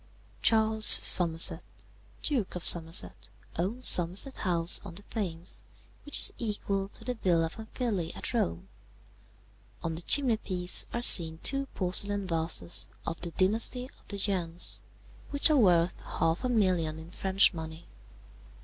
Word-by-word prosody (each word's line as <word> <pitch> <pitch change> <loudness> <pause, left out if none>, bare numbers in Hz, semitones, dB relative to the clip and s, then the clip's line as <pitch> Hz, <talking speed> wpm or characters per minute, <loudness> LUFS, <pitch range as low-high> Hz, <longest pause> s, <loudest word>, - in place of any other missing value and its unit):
"Charles 220 -1 +1
Somerset, 165 -3 +5 0.6
Duke 250 -12 -4
of 180 - -6
Somerset, 165 0 +2 0.3
owns 215 +9 -3
Somerset 185 +10 +4
House 170 -3 +2
on 170 - -12
the 200 - -10
Thames, 180 -6 -6 0.4
which 290 - 0
is - - +4
equal 200 -3 -4
to - - -7
the 250 - -4
Villa 170 -7 -2
Pamphili 220 -5 -6
at - - -7
Rome. 85 0 -4 1.2
On 165 - -5
the 160 - -7
chimney 250 +3 +2
piece 180 -4 0
are 235 - -6
seen 160 -7 +7
two 275 0 -2
porcelain 200 +2 +1
vases 165 0 0 0.2
of 165 - -7
the 170 - -5
dynasty 220 +8 +1
of - - -24
the 200 - -9
Yuens, 180 -4 -2 0.5
which 285 +2 +2
are 300 - +1
worth 175 -6 0
half 165 +6 -4
a 255 - -3
million 180 -9 -2
in 160 +2 -14
French 190 +1 0
money. 160 0 -10
185 Hz, 140 wpm, -26 LUFS, 165-220 Hz, 1.2 s, seen